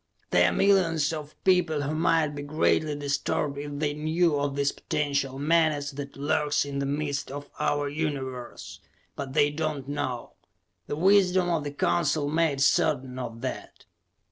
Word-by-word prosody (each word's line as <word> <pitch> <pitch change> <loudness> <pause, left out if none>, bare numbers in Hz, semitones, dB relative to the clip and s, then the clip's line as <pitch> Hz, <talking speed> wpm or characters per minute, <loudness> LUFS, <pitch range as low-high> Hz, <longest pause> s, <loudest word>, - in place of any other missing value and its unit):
There 90 0 +5
are - - -2
millions 165 - +3
of 150 -1 -7
people 170 -6 +2
who 145 +2 -2
might 160 -1 +2
be 145 -1 -6
greatly 150 +1 +1
disturbed 140 0 -1
if 145 0 -5
they 145 0 0
knew 155 +1 +1
of 140 -1 -1
this 140 0 +1
potential 140 -3 -2
menace 155 -1 +2
that 140 0 -8
lurks 145 +1 +1
in 140 -1 -4
the 140 - -1
midst 145 0 -2
of 145 +1 -8
our 145 0 0
Universe, 140 -5 -5 0.4
but 135 -2 -6
they 145 -1 +3
do 150 +2 -6
not 145 -4 -3
know. 140 -4 -4 0.5
The - - -2
wisdom 185 +1 +4
of 160 -3 0
the 145 - -3
Council 150 0 +1
made 155 -2 +1
certain 130 -2 +2
of 115 -2 -6
that. 130 - -6
145 Hz, 165 wpm, -27 LUFS, 140-155 Hz, 0.5 s, There